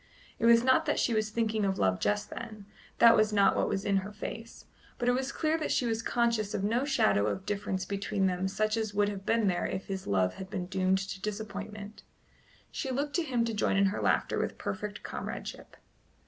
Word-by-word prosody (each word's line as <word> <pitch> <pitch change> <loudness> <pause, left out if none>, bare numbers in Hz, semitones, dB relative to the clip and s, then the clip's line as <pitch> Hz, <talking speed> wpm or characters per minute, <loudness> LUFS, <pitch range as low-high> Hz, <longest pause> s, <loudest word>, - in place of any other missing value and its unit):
It 230 - +3
was 235 0 +6
not 260 0 +3
that - - +1
she 235 - +1
was 215 -1 +1
thinking 220 -1 0
of 195 -1 0
love 95 -1 +1
just 105 0 -1
then 215 -3 -8 0.3
that 230 0 +8
was 215 0 +3
not 200 -1 +4
what - - +1
was 195 -1 -2
in 200 -1 +2
her 195 +2 -3
face; 225 +2 -8 0.3
but 245 - -2
it - - +6
was 260 +2 -1
clear 315 +2 0
that 310 - -2
she 250 - +1
was 225 -1 0
conscious 230 -3 0
of 195 - -2
no 235 +6 +1
shadow 100 - +2
of 100 -2 -3
difference 200 -2 -2
between 200 0 -1
them 185 0 0
such 215 +3 0
as 220 -2 -2
would 205 0 +3
have 195 -1 -7
been 230 -1 +2
there 180 -3 +1
if 190 - -4
his 190 -1 -5
love 95 -2 +2
had 190 0 -8
been 185 -3 -3
doomed 190 +1 +1
to 190 0 -5
disappointment. 210 0 -6 0.7
She 270 - -4
looked 280 +3 -2
to - - +2
him 250 -7 0
to 230 - -2
join 205 -2 +1
in 195 - +4
her - - -3
laughter - - +1
with - - -2
perfect 205 +1 -5
comradeship. - - -6
210 Hz, 220 wpm, -30 LUFS, 190-230 Hz, 0.7 s, that